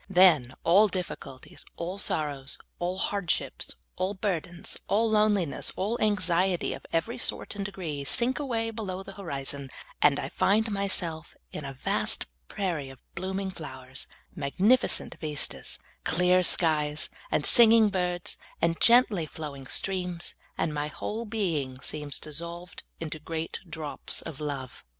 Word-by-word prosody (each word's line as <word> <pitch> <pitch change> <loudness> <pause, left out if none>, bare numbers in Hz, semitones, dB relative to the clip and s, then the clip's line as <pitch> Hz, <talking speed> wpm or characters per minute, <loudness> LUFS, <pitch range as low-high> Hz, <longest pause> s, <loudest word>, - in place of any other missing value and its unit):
Then 170 -10 +5
all 200 +6 +6
difficulties, 180 -8 -6
all 180 +4 -4
sorrows, 145 -7 0 0.2
all 180 +1 -1
hardships, 195 -2 -1 0.2
all 190 +2 -1
burdens, 175 -3 -3
all 220 +2 +2
loneliness, 210 -7 +2
all 205 +5 0
anxiet}^ 185 -3 +1
of - - -12
every 205 +10 -1
sort - - +1
and 200 - -3
degree, 170 -8 -4
sink 240 - +3
awa^^ 225 -6 -2
below 195 -4 -4
the 195 - -9
horizon, 140 -7 -3 0.3
and 145 -1 +5
I - - -3
find 220 +3 +2
myself 180 -5 -1 0.2
in 150 - -5
a 135 - -5
vast 130 - +2 0.2
prairie 165 -8 -2
of 135 - -11 0.2
blooming 190 +2 -3
flowers, 130 -6 -8 0.2
and - - -24
magnificent 200 - +2
vistas, 150 -2 -1
and - - -31
clear 180 +1 +5
skies, 155 -4 +3 0.2
and - - +1
singing 230 -3 +8
birds, 180 -2 -1 0.2
and 165 0 +1
gently 230 -8 +5
flowing 140 -4 -7
streams, 180 -1 -2 0.2
and 155 - 0
my 150 0 -1
whole 215 +9 -4
being 165 - -1
seems 150 -3 -3
dissolved 170 +4 -5 0.2
into 160 -1 -5
great 160 +1 -4
drops 155 -2 -2
of 160 -3 -7
love. 140 -4 -5
175 Hz, 140 wpm, -28 LUFS, 150-200 Hz, 0.3 s, singing